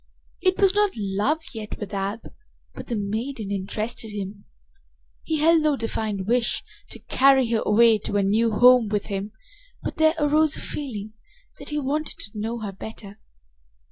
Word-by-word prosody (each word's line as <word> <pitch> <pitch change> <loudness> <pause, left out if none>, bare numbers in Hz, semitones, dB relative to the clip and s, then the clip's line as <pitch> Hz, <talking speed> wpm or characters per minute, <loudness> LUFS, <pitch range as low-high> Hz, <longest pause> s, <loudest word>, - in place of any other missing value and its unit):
It 370 -1 +2
was 390 -2 +4
not 415 -1 +2
love 210 +10 0
yet 215 -2 -6
with 210 -1 -7
Ab, 200 +3 -2 0.5
but - - -9
the 240 - -2
maiden 215 +2 -3
interested 215 +4 -2
him. 200 -1 -6 0.8
He 320 - -2
held 325 +1 +5
no 305 -2 +2
defined 220 -5 -3
wish 235 +2 +1 0.3
to - - -8
carry 265 -1 +4
her 225 - +2
away 225 +1 +5
to 205 - -2
a 200 - +2
new 220 +4 +2
home 245 +1 +6
with 205 -1 -1
him, 195 +2 -3 0.5
but - - -4
there 315 +1 +4
arose 305 +1 +3
a - - -5
feeling 220 -7 -5 0.5
that - - -6
he 300 - -2
wanted 295 +3 -2
to 205 - -5
know 225 +2 -3
her 205 -2 -4
better. 205 +1 -10
225 Hz, 170 wpm, -24 LUFS, 205-280 Hz, 0.8 s, home